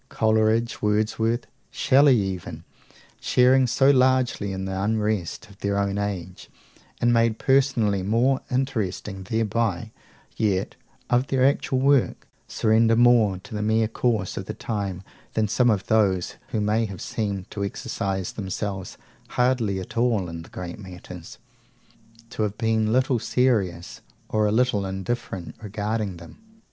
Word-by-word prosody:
Coleridge, 110 +1 +1
Wordsworth, 110 +3 0 0.2
Shelley 135 -1 +4
even 95 -4 -4 0.6
sharing 130 +1 +4
so 135 +3 +4
largely 130 -6 +2
in 95 0 -4
the 95 0 -3
unrest 105 -1 -1
of 100 -2 -18
their 100 0 -1
own 100 0 0
age, 95 -3 -5 0.5
and 120 0 +3
made 115 -1 +2
personally 130 -7 +2
more 120 +7 +2
interesting 110 -7 -2
thereby, 110 +2 -1 0.4
yet, 100 -4 0 0.4
of 125 +2 +3
their 130 -1 +2
actual 135 -1 +1
work, 140 -1 +2 0.2
surrender 115 +1 +3
more 115 -5 +4
to 125 - -11
the 105 - -2
mere 110 +1 +2
course 110 -4 -1
of 100 +2 -5
time 100 -5 -4 0.3
than 110 -1 +2
some 120 +4 +2
of 100 -4 +1
those 100 -5 +2
who 110 - -2
may 105 +2 +1
have 95 -3 -8
seemed 100 -3 -4
to 100 - -3
exercise 95 -1 -3
themselves 95 -1 -5 0.3
hardly 125 -6 +1
at 95 - -8
all 115 -6 +1
in 85 0 -7
great 85 +3 -8
matters, 90 -3 -10 0.9
to - - -4
have 105 -1 -1
been 110 -1 +1
little 130 0 +2
serious, 100 -10 0 0.3
or 110 -1 +2
a - - +1
little 110 -3 +2
indifferent, 95 -1 -4
regarding 105 -2 -3
them. 85 - -13
110 Hz, 135 wpm, -24 LUFS, 95-120 Hz, 0.9 s, Shelley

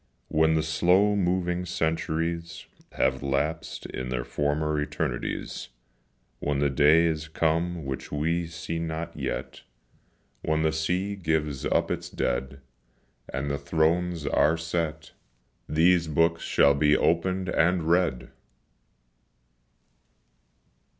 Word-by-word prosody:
When 80 +1 +3
the 80 - +1
slow 90 +7 +3
moving 90 -2 0
centuries 85 +1 -2 0.3
Have 65 0 +1
lapsed 70 +4 -2
in 65 -1 -5
the 60 -1 -2
former 75 +3 -1
eternities, 65 -2 -3 0.7
When 75 -1 -1
the 70 0 +1
day 75 +4 +5
is 80 -2 -1
come 80 +1 0
which 65 -1 -5
we 80 +3 0
see 80 0 -5
not 80 0 -4
yet, 65 - -4 0.8
When 80 0 0
the 80 - +2
sea 90 +6 -1
gives 80 -6 -1
up - - +1
its - - -3
dead 65 +2 -2 0.7
And 70 +2 -2
the 70 - -2
thrones 85 0 0
are 80 +3 +3
set, 80 -1 -3 0.6
These 85 +2 +3
books 85 +2 +2
shall 70 - +4
be 75 +1 +3
opened 90 +3 +1
and 85 +1 +2
read! 85 -5 +1
80 Hz, 115 wpm, -26 LUFS, 75-85 Hz, 0.8 s, day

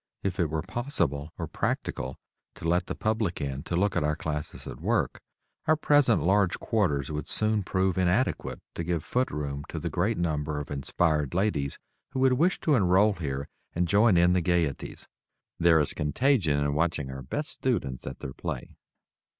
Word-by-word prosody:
If 95 -2 -2
it 85 -3 +2
were 80 0 -2
possible 90 - -1
or - - -3
practical 65 - -3 0.4
to 85 - -5
let 90 +2 +2
the - - -3
public 110 -4 -1
in 70 -2 -3
to 85 - -2
look 100 +3 +1
at - - +2
our 75 0 +1
classes 75 -1 -4
at - - -8
work, - - 0 0.5
our 155 - +5
present 145 -6 +4
large 95 0 +3
quarters 80 - 0
would 75 -2 -4
soon 110 -1 +2
prove 95 0 0
inadequate 95 +8 0
to 85 - -4
give 85 -1 -1
foot 125 +1 0
room 70 -1 -4
to - - -5
the - - -3
great 105 +6 +1
number 75 -3 -1
of 75 - -7
inspired 75 +2 0
ladies 90 -8 0 0.4
who 130 - -1
would 130 -1 +5
wish 170 +8 +2
to 155 - +2
enroll 100 -2 +4
here 70 -6 -4 0.3
and 90 +1 +1
join 100 +1 +5
in 90 +1 +5
the 90 - +2
gayeties. 85 -5 -1 0.5
There 85 -1 +5
is 75 - 0
contagion 80 - +2
in 70 0 +1
watching 75 -3 0
our 65 0 -7
best 145 - -2
students 90 - -2
at - - -7
their 65 - -5
"play." - - -5
85 Hz, 185 wpm, -28 LUFS, 75-105 Hz, 0.5 s, our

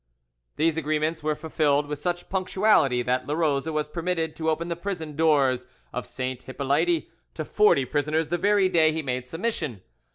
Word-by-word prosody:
These 160 +1 +1
agreements 155 +1 -1
were 155 0 0
fulfilled 150 -2 +1
with 145 -1 -5
such 175 +2 -2
punctuality, 185 - +2
that 125 +1 -1
Larose 150 -1 0
was 155 -1 -1
permitted 165 0 -2
to 160 -1 0
open 160 +2 -1
the 170 - -2
prison 170 -4 -5
doors 140 -5 +2 0.3
of 125 - -4
St. 130 -1 -4
Hippolyte 145 +6 0 0.3
to 155 - -4
forty 210 -10 +3
prisoners 150 +3 0
the 175 +1 0
very 200 0 +4
day 165 -4 +4
he 160 0 -3
made 125 -2 -3
submission. 165 - -3
155 Hz, 165 wpm, -25 LUFS, 140-170 Hz, 0.3 s, very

